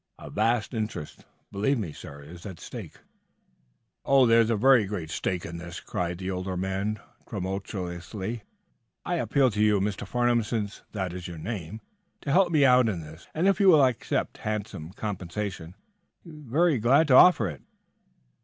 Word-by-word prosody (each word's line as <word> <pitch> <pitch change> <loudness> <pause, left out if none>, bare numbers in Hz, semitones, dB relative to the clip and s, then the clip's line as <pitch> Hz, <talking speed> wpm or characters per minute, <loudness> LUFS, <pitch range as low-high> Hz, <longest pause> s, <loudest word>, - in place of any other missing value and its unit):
"A - - -10
vast 115 +3 0
interest, 110 -9 -5 0.3
believe 105 +8 +1
me, 90 -9 -4
sir, 70 0 -10
is 85 +4 -12
at 95 -4 -9
stake." - - -9 1.1
"Oh, 135 -1 +5
there 115 0 +6
is 115 - +1
a 115 - +2
very 125 0 +5
great 90 -6 -5
stake 90 +1 -2
in 85 0 -6
this," 85 0 -7
cried 90 -3 -3
the 95 +1 -4
older 90 0 -3
man, 95 +3 -2 0.3
tremulously. 95 +3 -4 0.6
"I 175 - -1
appeal 140 -5 +2
to 105 0 -1
you, 105 -1 +4
Mr. 100 +1 -2
Farnum, 120 -1 +2
since 105 -2 -3
that 95 -4 -3
is 90 -1 -6
your 85 -2 -8
name, 100 +2 -6 0.4
to 140 - -3
help 180 +3 +4
me 150 -4 +4
out 125 -2 +5
in 90 -6 -3
this. 80 +2 -12
And, 170 +5 +2
if 195 -2 +3
you 200 - +4
will 155 -7 +7
accept 125 -3 -2
handsome 105 -6 -4
compensation, 95 -5 -5
I 205 - -43
shall 170 - -11
be 150 - -12
very 155 +1 +3
glad 135 +8 +4
to - - +5
offer 130 - +7
it." 75 -6 -7
105 Hz, 180 wpm, -27 LUFS, 90-125 Hz, 1.1 s, will